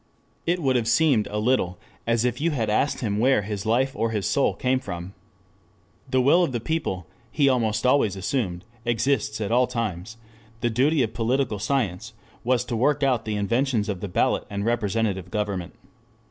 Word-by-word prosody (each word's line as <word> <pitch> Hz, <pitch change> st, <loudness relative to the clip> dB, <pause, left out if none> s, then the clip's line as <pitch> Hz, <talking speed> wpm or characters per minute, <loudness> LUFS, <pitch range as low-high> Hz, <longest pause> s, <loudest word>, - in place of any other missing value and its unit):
It 175 Hz, 0 st, +1 dB
would 130 Hz, -2 st, +2 dB
have 115 Hz, -2 st, -1 dB
seemed 120 Hz, -2 st, +3 dB
a 105 Hz, -, -4 dB
little 105 Hz, -6 st, +1 dB, 0.3 s
as 115 Hz, 0 st, +2 dB
if 125 Hz, +2 st, -1 dB
you 170 Hz, -, +2 dB
had 115 Hz, -9 st, -1 dB
asked 140 Hz, +7 st, +1 dB
him 105 Hz, -3 st, -1 dB
where 125 Hz, -2 st, +3 dB
his 105 Hz, 0 st, -4 dB
life 130 Hz, +4 st, +1 dB
or 115 Hz, -, 0 dB
his 105 Hz, -3 st, -2 dB
soul 140 Hz, -, +2 dB
came 130 Hz, -1 st, +1 dB
from. 90 Hz, -4 st, -7 dB, 1.0 s
The 130 Hz, 0 st, +2 dB
will 140 Hz, +8 st, +5 dB
of 160 Hz, -, -1 dB
the 120 Hz, -, -1 dB
people, 115 Hz, -, -2 dB, 0.3 s
he 145 Hz, -2 st, +2 dB
almost 115 Hz, -4 st, +1 dB
always 125 Hz, -7 st, +3 dB
assumed, 95 Hz, -3 st, -2 dB, 0.2 s
exists 120 Hz, -1 st, 0 dB
at 105 Hz, 0 st, -2 dB
all 125 Hz, +1 st, +4 dB
times; 110 Hz, -3 st, -4 dB, 0.4 s
the 120 Hz, -, +1 dB
duty 135 Hz, +5 st, +3 dB
of 110 Hz, -, -3 dB
political 120 Hz, -1 st, 0 dB
science 110 Hz, -3 st, -1 dB, 0.3 s
was 125 Hz, 0 st, +1 dB
to 120 Hz, -, -3 dB
work 145 Hz, +5 st, +2 dB
out 125 Hz, -4 st, +2 dB
the 110 Hz, -1 st, -2 dB
inventions 115 Hz, +1 st, 0 dB
of 100 Hz, -3 st, -2 dB
the 105 Hz, -, -4 dB
ballot 90 Hz, -, +1 dB
and 100 Hz, 0 st, -3 dB
representative 105 Hz, -5 st, 0 dB
government. 100 Hz, -4 st, -3 dB
115 Hz, 185 wpm, -24 LUFS, 105-130 Hz, 1.0 s, will